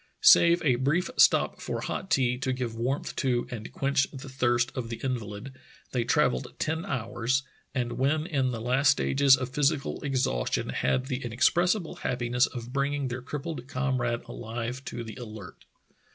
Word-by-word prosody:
Save 170 - +7
a 130 -4 +4
brief 155 - +1
stop - - +4
for - - -3
hot 190 - -4
tea 125 -6 +2
to 130 -1 -1
give 125 -3 -3
warmth 125 +5 -2
to 125 -3 +1
and 110 -3 -6
quench 140 0 +1
the 135 0 -9
thirst 120 -2 +1
of 120 -4 -4
the 115 - -5
invalid, 120 -1 -4 0.4
they 125 -2 0
travelled 150 +1 +1
ten 160 +4 -2
hours, 125 - -1 0.3
and 120 -2 -2
when 150 +4 +1
in 140 -7 0
the 120 -2 -3
last 130 +4 +3
stages 140 -1 +4
of 130 -1 -4
physical 145 +1 0
ex 135 -2 0
haustion - - -1
had 130 - 0
the 130 -1 -3
inexpressible 170 - +1
happiness 125 0 +1
of 120 0 -8
bringing 140 0 0
their 125 +1 -4
crippled 135 0 -5
comrade 130 -3 -1
alive 120 +3 -5
to 120 - -5
the 110 -1 -9
Alert. 110 -6 -10
130 Hz, 165 wpm, -28 LUFS, 120-140 Hz, 0.4 s, Save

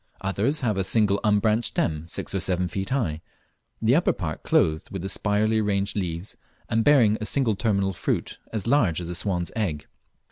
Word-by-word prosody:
Others 105 +10 0
have 110 -6 0
a - - +1
single 100 0 +2
unbranched 105 +2 +2
stem, 80 0 -1
six - - -5
or 95 - 0
seven 90 0 0
feet 95 +2 -4
high, 90 - -1 0.6
the 115 +2 +3
upper 165 +5 +3
part 80 -4 -5
clothed 80 0 +1
with 95 -2 -6
the - - -2
spirally 105 +3 +1
arranged 100 -1 0
leaves, 90 -2 -3 0.3
and 115 0 +1
bearing 120 -7 +4
a - - -2
single 125 -7 +1
terminal 100 -3 0
fruit - - -3
ac 110 -1 -3
large 115 - +3
as 85 -1 -5
a - - -3
swan's 90 -1 -2
egg. 80 -10 -2
100 Hz, 185 wpm, -25 LUFS, 90-110 Hz, 0.6 s, bearing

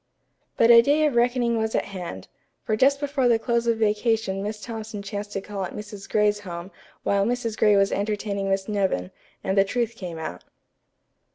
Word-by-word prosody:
But 230 - +6
a 235 0 +10
day 290 +5 +3
of 295 - +1
reckoning 240 -1 +2
was 220 0 -1
at - - +1
hand, 175 - -7 0.4
for 215 - 0
just 275 +5 +3
before 280 -3 0
the 235 -1 +4
close 235 0 0
of 230 -1 +2
vacation 215 -2 +1
Miss 210 +1 -4
Thompson 220 -1 -6
chanced 205 +1 -5
to 195 - -2
call 200 -1 -5
at 185 - -6
Mrs. 205 -1 -8
Gray's 210 -1 +2
home 180 -1 -7 0.3
while 200 0 +2
Mrs. 230 0 -1
Gray 210 -1 +4
was 195 0 +3
entertaining 200 -1 -2
Miss 195 0 0
Nevin, 190 - -1 0.3
and 190 - 0
the 195 - +6
truth 235 +3 -1
came 175 -6 -6
out. 160 - -6
210 Hz, 190 wpm, -24 LUFS, 195-235 Hz, 0.4 s, a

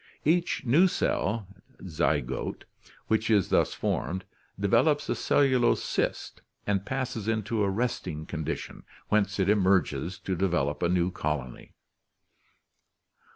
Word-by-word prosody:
Each 170 +1 +1
new 155 +10 +5
cell 110 - -1 0.4
(zygote) 70 -7 -1 0.4
which 110 0 0
is 105 -4 +3
thus - - +2
formed 95 +1 -2 0.3
develops 120 +9 +2
a - - +2
cellulose 130 -4 +2
cyst - - -2 0.2
and 100 -1 -1
passes 130 -5 -3
into 110 -1 0
a 100 - +1
resting 95 -8 -2
con 80 -1 -5
dition, - - -5 0.3
whence 105 -1 +1
it 95 -1 +1
emerges 95 -3 +2
to 95 - -2
develop 85 -6 0
a 85 - +2
new 90 0 +1
colony. 75 -7 -4
100 Hz, 120 wpm, -28 LUFS, 90-115 Hz, 0.4 s, new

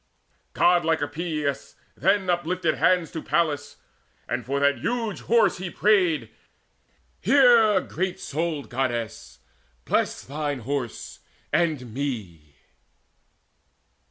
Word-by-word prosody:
Godlike 165 -3 +3
Epeius 150 -2 -3 0.2
then 195 -1 +2
uplifted 175 +1 0
hands 180 -4 +2
To 160 - -5
Pallas, 145 -2 -1 0.5
and - - -2
for 140 +2 -2
that 140 -2 +2
huge 225 - -2
Horse 230 0 +3
he 185 -1 -4
prayed: 185 -5 +2 0.9
"Hear, 235 -7 +5
great 180 +2 -3
souled 155 -1 -3
Goddess: 120 -3 -3 0.4
bless - - 0
thine 145 -1 -4
Horse 130 -1 -4 0.3
and 155 -8 0
me!" 100 - -5
155 Hz, 100 wpm, -25 LUFS, 140-180 Hz, 0.9 s, Hear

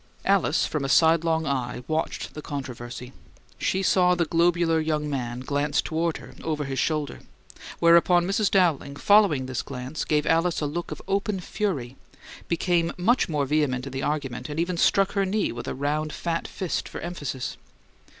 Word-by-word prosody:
Alice 195 -6 +3
from 150 -3 -2
a 135 - -2
sidelong 160 +2 +4
eye 125 -3 -2
watched 160 0 -2
the 150 - -7
controversy: 125 -3 -7 0.5
she 190 +1 0
saw 180 -1 +4
the 175 -1 +1
globular 170 0 +2
young 155 -1 -1
man 125 -4 -3
glance 145 +2 0
toward 165 0 -1
her, - - -12
over 155 -2 -1
his 135 -1 -3
shoulder; 155 -2 -1 0.6
whereupon 170 +1 +5
Mrs. 195 +2 +1
Dowling, 160 -7 +2
following 200 -7 +4
this 130 -1 -3
glance, 130 +2 -5
gave 150 -1 +1
Alice 165 +1 +2
a 150 - -1
look 170 +4 -3
of - - -7
open 200 0 0
fury, 160 - -3 0.5
became 170 0 +1
much 225 +7 +2
more 150 -3 0
vehement 135 -3 0
in 135 - -6
the 135 - -3
argument, 145 -2 -3
and 150 +2 -4
even 175 +1 0
struck 195 +3 +3
her 200 - +1
knee 200 +2 0
with 120 - -7
a - - -3
round, 150 +3 -1
fat 165 +1 -3
fist 185 -3 -3
for - - -7
emphasis. 145 -8 -5
155 Hz, 170 wpm, -25 LUFS, 140-175 Hz, 0.6 s, whereupon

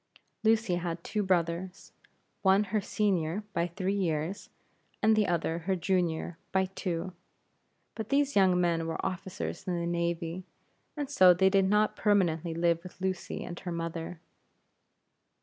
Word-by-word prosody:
Lucy 220 -4 +3
had 170 -1 -4
two 210 0 -1
brothers; 180 0 -1 0.5
one 195 +1 +4
her 215 - +2
senior, 195 -2 0
by 170 - +1
three 185 +2 -2
years, 175 -1 -2 0.5
and 220 0 +4
the 215 -1 +2
other 170 -1 0
her 190 +3 -1
junior 175 -2 -1
by 190 0 +2
two. 175 0 -3 0.8
But 220 -2 -6
these 285 0 +2
young 185 -2 +5
men 170 -2 +1
were 160 - -3
officers 190 +1 -4
in 175 -1 0
the 170 - -2
navy; 170 +1 -2 0.5
and 290 -1 -2
so 185 -10 +6
they 190 +2 +4
did 195 -1 +4
not 210 +2 +2
permanently 175 -5 +1
live 170 0 +2
with 180 +1 -12
Lucy 190 -1 -3
and 175 - -7
her 180 - -5
mother. 165 0 -4
180 Hz, 150 wpm, -30 LUFS, 170-195 Hz, 0.8 s, so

